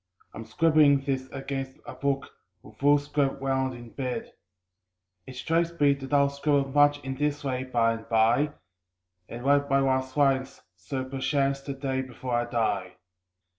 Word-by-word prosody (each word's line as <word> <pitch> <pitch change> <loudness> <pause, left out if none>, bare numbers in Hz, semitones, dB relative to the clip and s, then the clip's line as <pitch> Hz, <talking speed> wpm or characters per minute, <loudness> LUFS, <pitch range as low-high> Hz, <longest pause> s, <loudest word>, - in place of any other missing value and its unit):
I'm 115 - -8
scribbling 155 -4 +4
this 135 -1 -3
against 135 -1 -5
a - - -7
book, 140 -1 -2 0.3
with - - -15
foolscap 145 -1 +2
round, 130 -1 -1
in 120 -1 -11
bed. 130 -2 -4 0.9
It 130 - -9
strikes 165 +5 -1
me 145 -1 +5
that 135 0 -8
I'll 140 -1 +4
scribble 140 -1 +1
much 145 +1 +4
in 135 0 -3
this 150 0 -1
way 130 -2 -2
by 115 -3 +2
and 115 -1 -9
by, 115 +6 +3 0.8
And 120 +2 -7
write 140 0 +3
my 135 - +4
last 130 0 0
lines 135 -2 +1
so 130 +10 -5
perchance 135 +1 0
the 140 0 -6
day 135 -1 -2
before 130 -1 -6
I 120 0 +1
die. 100 -6 -1
135 Hz, 160 wpm, -27 LUFS, 130-145 Hz, 0.9 s, me